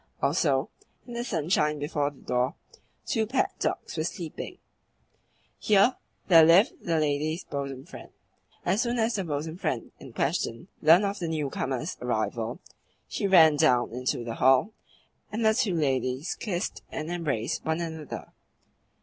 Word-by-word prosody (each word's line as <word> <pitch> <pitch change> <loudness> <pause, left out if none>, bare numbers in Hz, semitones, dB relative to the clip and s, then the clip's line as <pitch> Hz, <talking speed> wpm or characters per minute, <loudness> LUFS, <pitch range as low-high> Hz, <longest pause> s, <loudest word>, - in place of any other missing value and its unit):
Also, - - +1 0.4
in 240 - -9
the 235 0 -2
sunshine 155 - +1
before 145 0 -1
the 145 - -18
door 125 +1 0 0.5
two 220 -4 0
pet 255 +4 +1
dogs - - -2
were 155 - 0
sleeping. 170 - -6 1.0
Here 210 +4 +4 0.3
there 165 -4 +8
lived 175 - +5
the 165 -1 0
lady's 155 +2 0
bosom 140 -1 -5
friend. 185 - -11 0.6
As 190 +5 +2
soon 240 0 -1
as 230 +1 +1
the 195 - -1
bosom 160 0 -4
friend 155 -10 -3
in 130 - -11
question 135 +2 -2
learnt 165 +6 +6
of 200 +1 -2
the 170 - -2
newcomer's 145 -1 -2
arrival, 115 - -2 0.5
she 200 - -2
ran 160 -6 +7
down 125 -4 +3
into 125 0 -2
the 115 -1 -4
hall, 130 - +3 0.6
and 220 +1 -1
the 220 - +5
two 215 -6 +1
ladies 135 0 0
kissed 185 -2 -3
and 155 +2 -5
embraced 145 -10 -2
one 160 +1 -1
another. 160 -3 -6
160 Hz, 150 wpm, -27 LUFS, 135-190 Hz, 1.0 s, there